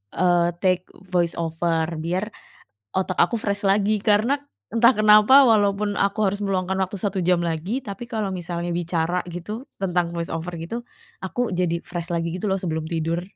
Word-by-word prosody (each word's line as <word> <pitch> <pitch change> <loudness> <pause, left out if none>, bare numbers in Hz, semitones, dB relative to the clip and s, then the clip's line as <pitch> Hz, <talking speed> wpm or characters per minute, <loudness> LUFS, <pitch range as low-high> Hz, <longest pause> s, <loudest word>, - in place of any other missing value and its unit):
eee, 175 -1 +3
take 185 -1 +2 0.3
voice 175 -2 +1
over 165 0 0
biar 185 +6 -2 0.6
otak 185 -1 -1
aku 205 +7 +3
fresh 200 -1 -2
lagi. 205 +2 +3
Karena 225 +6 +3 0.3
entah 235 +2 +5
kenapa 215 +5 +7
walaupun 205 -1 +2
aku 200 +2 0
harus 200 +1 -3
meluangkan 190 -1 -1
waktu 190 +2 -3
1 195 -3 -1
jam 180 -1 +3
lagi, 170 - -2
tapi 210 -1 -7
kalau 220 -4 -3
misalnya 175 -1 -4
bicara 175 +1 -1
gitu 210 +9 -6 0.2
tentang 175 -2 0
voice 170 -1 -3
over 165 +2 -4
gitu 230 +9 -5 0.4
aku 245 +5 -1
jadi 170 -2 0
fresh 175 -1 -6
lagi 170 0 -1
gitu 185 - -7
loh 190 -1 0
sebelum 160 -3 -2
tidur. 165 +1 -2
185 Hz, 165 wpm, -23 LUFS, 170-210 Hz, 0.6 s, kenapa